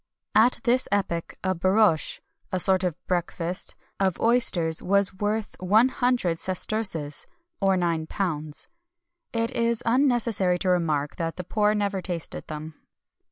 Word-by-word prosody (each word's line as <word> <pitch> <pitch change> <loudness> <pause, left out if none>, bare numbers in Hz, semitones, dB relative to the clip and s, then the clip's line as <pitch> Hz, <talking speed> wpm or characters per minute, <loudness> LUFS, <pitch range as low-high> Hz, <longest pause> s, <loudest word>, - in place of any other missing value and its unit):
At 230 +3 +4
this 250 +1 +2
epoch 190 -5 -1
a 185 0 +1
borriche 185 -1 +2 0.3
(a 185 - 0
sort 190 +1 +2
of 180 -4 -1
basket) 175 0 -2 0.2
of 190 -3 +1
oysters 180 -9 +3
was 200 +1 +4
worth 210 +2 -3
one 215 +7 +4
hundred 245 -11 0
sesterces 185 -6 -1 0.3
(£9).[XXI 175 -5 0
220] 155 -5 -2 0.7
It 230 +1 -1
is 235 0 0
unnecessary 230 -7 +2
to 185 +1 -1
remark 155 -5 0
that 165 -1 -3
the 180 - -6
poor 210 +3 +1
never 200 -2 -1
tasted 175 -2 -5
them. 155 +1 -7
190 Hz, 130 wpm, -25 LUFS, 170-215 Hz, 0.7 s, At